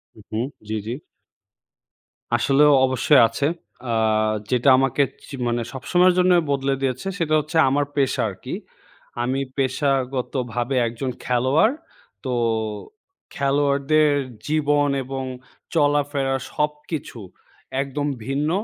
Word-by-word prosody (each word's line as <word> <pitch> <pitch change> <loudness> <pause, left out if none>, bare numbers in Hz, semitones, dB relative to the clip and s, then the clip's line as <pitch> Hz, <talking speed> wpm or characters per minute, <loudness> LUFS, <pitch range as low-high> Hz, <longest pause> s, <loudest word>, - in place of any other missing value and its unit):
হু, 110 - -14
হু। 110 - -2 0.3
জি, 110 - -2
জি। 120 +3 -3 1.4
আসলেও 140 +4 +4
অবশ্যই 130 +1 +4
আছে। 115 +5 -2 0.5
আ - - +1 0.6
যেটা 125 +2 +3
আমাকে 135 +1 +2 0.2
চি 140 - -7
মানে 120 0 0
সবসময়ের 175 +7 +3
জন্যই 180 -1 +4
বদলে 135 0 +1
দিয়েছে। 130 +5 -2
সেটা 160 -4 0
হচ্ছে 155 +2 -3
আমার 145 +2 +1
পেশা 135 -2 +1
আরকি। - - -8 0.7
আমি 130 +2 -1 0.2
পেশাগতভাবে 130 -2 -1
একজন 120 +3 -4 0.2
খেলোয়াড়। 130 - +3 0.5
তো 130 - -1 1.0
খেলোয়াড়দের 140 +2 +2 0.4
জীবন 145 -1 +2
এবং 135 +1 -5 0.5
চলাফেরা 145 -3 +1 0.2
সবকিছু 150 -3 -3 0.6
একদম 140 +1 -3 0.2
ভিন্ন। 140 +3 -1
140 Hz, 105 wpm, -22 LUFS, 130-150 Hz, 1.4 s, আসলেও